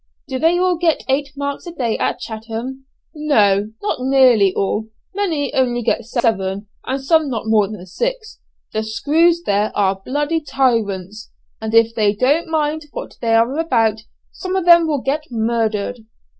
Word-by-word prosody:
"Do 260 -2 -3
they 330 +4 +3
all 360 -1 +2
get 330 -2 +1
eight 280 +1 0
marks 280 +4 -4
a - - -5
day 245 -9 -1
at - - 0
Chatham?" 235 +3 -6 0.3
"No, 210 -10 +2
not 410 - -1
nearly 255 -6 +4
all; 210 +2 -1 0.3
many 330 -9 -1
only 245 -2 +1
get 230 - 0
seven, 205 -5 -1 0.2
and 265 +1 -1
some 315 0 +3
not 230 -4 -3
more 220 -2 +3
than 205 -3 -8
six. 480 - -4 0.3
The 215 - 0
'screws' 310 +10 +2
there 205 -2 +1
are 195 -1 +1 0.5
tyrants, 215 -6 -1 0.3
and 220 0 -2
if 230 0 +5
they 210 -2 +1
don't 285 +10 +2
mind 315 -1 -1
what - - -7
they 225 -1 +2
are 235 +6 +2
about 225 -9 +1 0.3
some 370 0 -5
of 375 -2 0
them 340 -1 +7
will 290 -4 -1
get 295 +4 -1
murdered. 225 -2 -1
245 Hz, 160 wpm, -19 LUFS, 220-305 Hz, 0.5 s, them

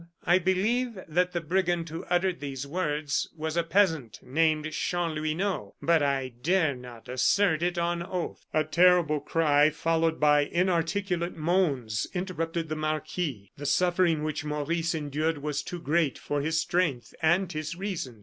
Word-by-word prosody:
I 175 +2 +5
believe 215 +6 0
that 180 +3 +1
the 175 - -2
brigand 175 0 0
who 165 +2 -6
uttered 180 0 +1
these 140 -1 -5
words 150 -2 -1
was 160 +1 -3
a 170 - +3
peasant 165 - +1
named 155 +2 +1
Chanlouineau, 165 +3 -2
but 165 -2 +3
I 135 -2 0
dare 160 -1 +2
not 125 -2 -11
assert 160 +6 +2
it 175 0 0
on 170 0 0
oath." 180 0 -5
A 155 - +2
terrible 170 -1 +4
cry, 150 0 +3
followed 165 +1 0
by 150 -1 +4
inarticulate 175 +1 0
moans, 150 - 0
interrupted 170 -3 -2
the 155 - -3
marquis. 155 - -3
The 145 0 -4
suffering 175 -3 +2
which 155 0 -2
Maurice 160 +3 -1
endured 155 +1 -1
was 150 0 -2
too 175 +4 -6
great 155 -2 +1
for 145 -1 -2
his 160 +2 0
strength 160 -8 0
and 175 +3 +2
his 155 +2 -4
reason. 175 - -5
160 Hz, 150 wpm, -28 LUFS, 150-175 Hz, -, I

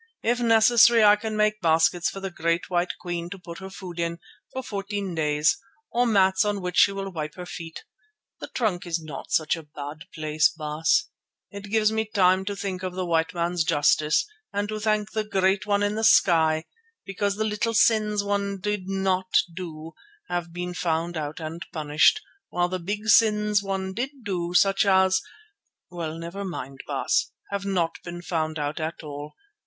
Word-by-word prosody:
If 240 +2 +1
necessary 230 0 +6
I 205 0 +8
can 215 0 -4
make 215 0 +2
baskets 165 +1 +3
for 195 - -7
the 195 -1 -4
great 170 +1 -1
white 175 0 +1
Queen 175 -1 -4
to 200 - -7
put 170 -2 -10
her 190 0 -8
food 185 -3 -9
in, 170 0 -1 0.3
for 260 - -5
fourteen 200 -3 -4
days, 150 0 +1 0.3
or 245 +1 +2
mats 190 -3 +4
on 205 -1 -1
which 180 -2 -4
she - - +6
will 195 0 -5
wipe 155 -3 -5
her 180 - -7
feet. 165 -1 -8 0.6
The - - -6
trunk 195 -7 -2
is 170 -1 -1
not 155 -4 -8
such 155 0 +2
a 165 - -8
bad 145 0 -9
place, 155 -1 +2
Baas. 155 - 0 0.5
It 200 -1 -8
gives 215 0 +2 0.2
time 185 -1 +4
to 205 +1 -3
think 195 -2 -4
of 185 -1 -4
the 185 -1 -2
white 165 0 0
man's 170 0 0
justice 150 -1 +2 0.3
and 205 0 -1
to 215 0 -3
thank 215 -1 0
the 220 -1 -1
Great 195 0 +1
One 205 0 +2
in 205 0 +1
the 220 +1 -3
Sky, 160 -6 +4 0.4
because 200 +1 -1
the 215 - -1
little 220 +2 -1
sins 215 -2 +3
one 200 -1 -1
did 205 -1 -3
not 190 -1 0 0.2
do 165 -3 -7 0.4
have 175 -1 -3
been 180 +1 -4
found 170 0 -1
out 150 -1 -4
and 165 +1 -6
punished, 155 - +3 0.3
while 175 0 0
the 185 0 -3
big 205 +5 -4
sins 210 -1 +4
one 190 -1 -3
did 265 +4 -5
do, 180 -4 -3
such 195 +1 +4
as—well, 190 - -1
never 170 +4 -6
mind, 135 -8 -6
Baas—have 200 0 -2
not 180 -4 -1
been 175 0 -7
found 160 -3 -2
out 150 +1 -3
at 160 +1 -4
all. 145 0 -8
185 Hz, 180 wpm, -25 LUFS, 165-205 Hz, 0.6 s, I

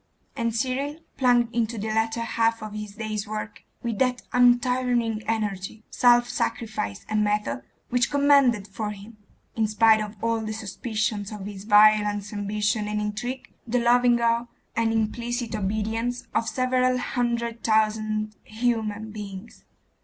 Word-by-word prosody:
and 230 -3 -1
Cyril 270 +5 -1 0.2
plunged 245 -2 +3
into 230 -1 0
the 220 +1 -3
latter 225 +1 0
half 230 -1 0
of 215 -1 -7
his 210 -1 -6
day's 215 -2 -4
work 215 0 -6 0.2
with 230 -3 -2
that 250 -1 +1
untiring 245 -2 +3
energy, 215 -1 -2
self 240 -1 +5
sacrifice, 220 - -3
and 215 -1 +1
method, 210 - 0 0.3
which 245 -1 +2
commanded 280 -7 +4
for 210 +1 -4
him, 210 +2 -10 0.4
in 220 -1 +1
spite 220 +1 +4
of 210 0 -5
all 230 -1 0
suspicions 215 -1 -3
of 210 -2 -7
his 200 -1 -8
violence, 210 -1 +4
ambition, 210 +1 -1
and 210 0 -1
intrigue, 215 +5 -4
the 240 +2 +1
loving 240 0 +4
awe 235 0 +1 0.3
and 225 0 +2
implicit 235 +1 -2
obedience 220 +4 -2
of 230 - +1
several 255 0 +1
hundred 235 -2 -2
thousand 215 -1 +1
human 220 -2 -2
beings. 205 0 -9
220 Hz, 140 wpm, -25 LUFS, 210-240 Hz, 0.4 s, self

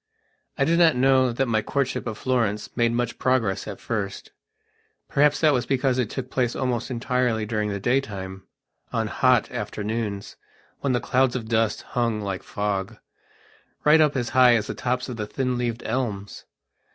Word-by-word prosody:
I 140 - +2
do 170 +2 +2
not 165 -4 +5
know 130 0 +4
that 130 +3 0
my 110 -2 +1
courtship 135 +1 -2
of 110 -2 -4
Florence 115 -5 -1
made 120 -1 +2
much 120 0 -2
progress 115 -7 +1
at - - -6
first. 100 -4 -4 0.8
Perhaps 145 0 +3
that 155 -2 +5
was 125 -2 0
because 130 -1 +1
it 120 -4 0
took 130 0 -5
place 125 -2 0
almost 125 -2 -1
entirely 125 -2 0
during 105 -1 -1
the 100 -1 -3
daytime, 95 -6 -2 0.4
on - - 0
hot - - +2
afternoons, 105 -1 -4 0.4
when 135 -2 0
the 125 - +2
clouds 130 -1 +2
of 115 -3 -4
dust 110 -1 +1
hung 115 -3 +1
like 100 -3 -3
fog, 100 -2 -3 0.9
right 155 +1 +6
up 150 -2 +3
as 120 -3 -1
high 125 -2 +6
as 110 -2 0
the - - -4
tops 125 0 -2
of 125 -3 -6
the 105 -1 -3
thin 130 +2 -1
leaved 120 -1 -2
elms. 105 -6 -3
120 Hz, 175 wpm, -24 LUFS, 105-130 Hz, 0.9 s, right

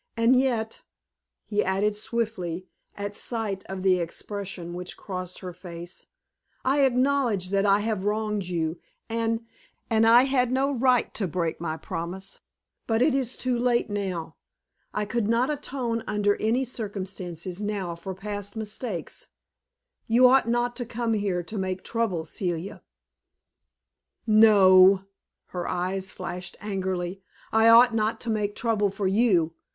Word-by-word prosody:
And 230 +3 +5
yet," 240 -4 0 0.6
he 210 -1 0
added, 200 +2 +1
swiftly, 205 -6 -3 0.3
at 205 0 -5
sight 215 -5 -3
of 190 -1 -5
the 185 -1 +4
expression 180 0 -5
which 180 +1 -6
crossed 185 -2 -6
her 180 -1 -6
face, 175 -1 -9 0.6
"I 270 +3 +3
acknowledge 250 -7 +1
that 200 0 +2
I 200 +1 +4
have 210 -3 -1
wronged 210 -1 -1
you, 165 -2 -2 0.3
and 230 0 -1 0.5
and 225 0 +4
I 235 +2 +8
had 260 -2 +1
no 270 +2 +2
right 255 -2 +2
to 195 - -2
break 170 -1 -2
my 160 -2 -2
promise; 180 +5 -6 0.5
but 225 +1 +3
it 290 0 +3
is 260 -2 -1
too 250 -2 0
late 240 -3 +1
now. 185 -6 -3 0.5
I 210 - -1
could 225 0 -1
not 240 +5 +2
atone 250 -5 -2
under 205 -1 +2
any 235 +5 +1
circumstances 190 -5 -5
now 205 -4 -2
for 175 +3 -7
past 205 +1 -5
mistakes. 220 -3 -5 0.8
You 245 +3 +6
ought 255 -2 +4
not 240 +1 +1
to 245 - -2
come 235 -1 -1
here 200 -4 0
to 210 +4 -5
make 185 -1 -3
trouble, 215 -9 -1
Celia." 175 +1 -4 1.4
"No," 195 -4 +7 0.5
her 175 -1 -4
eyes 185 +2 -2
flashed 180 -1 -7
angrily 190 -2 -3 0.3
"I 220 +1 +5
ought 235 +1 +8
not 220 0 0
to 235 - -1
make 210 -1 -1
trouble 220 -3 +1
for 195 +1 -4
you. 190 -5 +3
205 Hz, 145 wpm, -26 LUFS, 185-230 Hz, 1.4 s, I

